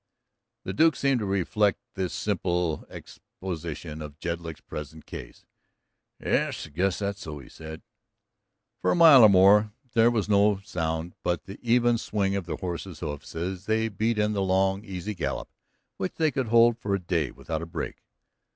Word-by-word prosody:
The - - -4
Duke 160 +1 +4
seemed 135 -2 +1
to 105 - -3
reflect 100 +2 +1 0.2
this 95 -2 -2
simple 90 -5 -1
exposition 80 -3 -7
of 75 -1 -8
Jedlick's 85 -1 -5
present 75 +1 -8
case. - - -10 0.7
"Yes, - - 0
I - - -13
guess 95 +5 0
that's 100 0 -3
so," 75 -2 -6
he 70 - -11
said. 80 0 -10 1.0
For - - +1
a - - +3
mile 160 -6 +9
or 110 - +9
more 100 +2 +6 0.2
there 115 0 +5
was 110 -4 0
no 105 0 +4
sound 80 -3 -3
but 90 -1 -1
the 100 +1 -10
even 120 0 +3
swing 100 -3 -1
of 95 -3 -3
their 85 - -2
horses' 90 -1 -5
hoofs 75 +1 -6
as 90 +3 -4
they 110 +1 +1
beat 110 +2 0
in 105 0 +1
the 100 - 0
long, 95 +1 +1
easy 100 0 -5
gallop 90 - -3 0.5
which 95 - -3
they 160 -2 +2
could 130 -2 -2
hold 115 +1 +5
for 100 -3 -1
a - - -2
day 85 -6 -1
without 80 -1 -5
a 85 - -6
break. 85 0 -5
95 Hz, 175 wpm, -27 LUFS, 85-105 Hz, 1.0 s, mile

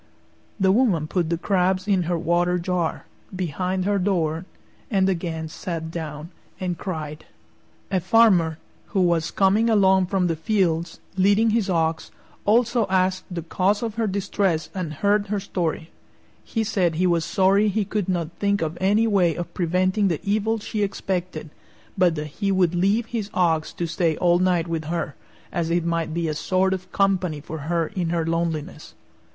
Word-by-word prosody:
The 190 -1 +4
woman 200 -8 +2
put 170 +1 -1
the 170 - 0
crabs 185 +1 +1
in 195 -3 +3
her 175 - +1
water 175 +2 +1
jar, 175 -1 -2 0.3
behind 185 +1 -2
her 200 0 +1
door, 175 -3 0 0.4
and 195 -4 +2
again 165 -3 -2
sat 160 0 -5
down 160 0 -6 0.3
and 180 -2 -2
cried. 155 -4 -6 0.7
A 190 - +2
Farmer, 185 -5 +4 0.4
who 190 - +4
was 170 -2 +2
coming 205 +4 +3
along 190 -3 +4
from 190 -1 +1
the 165 -2 0
fields, 170 -2 0 0.2
leading 205 +4 +4
his 215 -3 +1
ox, 165 -2 0 0.4
also 235 0 +3
asked 185 0 +1
the 175 -3 -5
cause 195 +6 0
of 225 -2 -2
her 225 0 -1
distress 190 -4 -1
and 180 -5 -3
heard 205 0 +3
her 205 0 -1
story. 170 -4 -3 0.5
He 225 - -2
said 185 -6 0
he 180 +3 +1
was 170 -2 +2
sorry 195 +3 +3
he 210 0 0
could 205 -1 -2
not 170 -3 -1
think 200 -2 +1
of 160 +2 -4
any 205 +4 +3
way 185 -7 +2
of 175 - -6
preventing 185 +3 +1
the 165 -5 0
evil 215 +2 +1
she 215 0 -4
expected, 180 -5 -3 0.4
but 180 -3 +3
that 150 -1 -3 0.2
he 200 -1 +2
would 180 -3 +2
leave 200 +6 +2
his 225 -3 -4
ox 165 -4 +1
to 170 - -3
stay 165 -1 0
all 175 -1 +3
night 180 -2 +2
with 165 -2 -3
her, 165 -1 -3 0.4
as 170 -1 -1
it 170 0 +1
might 165 -1 -1
be 170 +1 -1
a 155 - -1
sort 185 +5 +1
of 185 -1 -6
company 185 -6 +1
for 155 +2 -7
her 170 -1 +1
in 180 -5 -2
her 165 -1 0
loneliness. 165 -1 -3
180 Hz, 175 wpm, -23 LUFS, 165-195 Hz, 0.7 s, The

